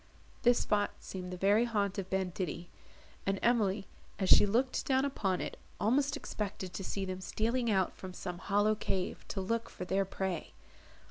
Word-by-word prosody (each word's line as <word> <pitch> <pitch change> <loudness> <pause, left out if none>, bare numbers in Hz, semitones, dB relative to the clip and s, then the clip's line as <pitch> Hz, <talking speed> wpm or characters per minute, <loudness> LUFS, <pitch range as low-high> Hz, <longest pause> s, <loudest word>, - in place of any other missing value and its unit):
This 245 0 +5
spot 205 -1 +2
seemed 180 -1 -6
the 180 - -4
very 205 +5 +4
haunt 205 -4 0
of 190 -1 -5
banditti; 180 -2 -2 0.6
and 195 0 +2
Emily, 210 -4 +3 0.3
as 190 -2 0
she - - +8
looked 245 +6 +1
down 265 0 +3
upon 195 -10 0
it, - - -4 0.2
almost 280 +5 +2
expected 200 -8 -4
to 195 - -4
see 195 +1 -2
them 185 0 -4
stealing 230 +6 0
out 190 -3 +2
from 185 - -8
some 180 -1 -5
hollow 205 +2 +3
cave 190 -3 -2
to 195 - -3
look 230 +4 -1
for 180 - -6
their 190 +2 +2
prey. 190 - -3
195 Hz, 175 wpm, -33 LUFS, 185-225 Hz, 0.6 s, she